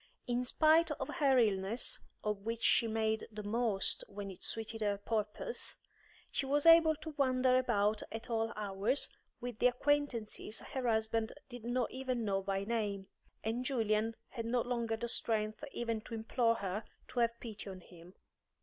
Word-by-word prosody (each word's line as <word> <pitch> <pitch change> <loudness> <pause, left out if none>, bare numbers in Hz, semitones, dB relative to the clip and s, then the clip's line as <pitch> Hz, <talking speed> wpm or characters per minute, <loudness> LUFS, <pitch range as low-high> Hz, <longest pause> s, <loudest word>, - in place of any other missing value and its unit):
In 245 0 0
spite 315 +5 +4
of 275 -3 -3
her 275 -5 +4
illness, 210 0 +1 0.2
of 210 -1 -1
which 230 +2 -4
she 230 - +5
made 220 0 0
the 210 -1 -6
most 215 -2 +1
when 200 -1 -6
it 185 - -11
suited 225 0 -3
her 205 -1 +1
purpose, 215 - -2 0.5
she 275 - -1
was 290 +2 +2
able 330 -1 +8
to 315 +1 -8
wander 255 -2 +3
about 215 -4 +2
at 225 +1 -6
all 225 -1 0
hours 210 +5 0 0.3
with 245 -2 -5
the - - +6
acquaintances 250 -5 0
her 260 -2 -3
husband 220 0 +1 0.2
did 245 -3 -9
not 245 0 0
even 255 -3 -2
know 195 -1 +1
by 195 0 -1
name, 205 -3 -2 0.3
and 230 +3 -1
Julian 225 -4 +1
had 230 -3 -4
no 240 +1 +2
longer 235 -2 -1
the 235 - -3
strength 220 0 0
even 230 -2 -2
to 230 - -7
implore 230 +1 +2
her 200 0 -3 0.3
to 255 - -2
have 235 0 +2
pity 215 -3 -6
on 185 -1 -8
him. 175 +1 -15
225 Hz, 165 wpm, -34 LUFS, 210-250 Hz, 0.5 s, able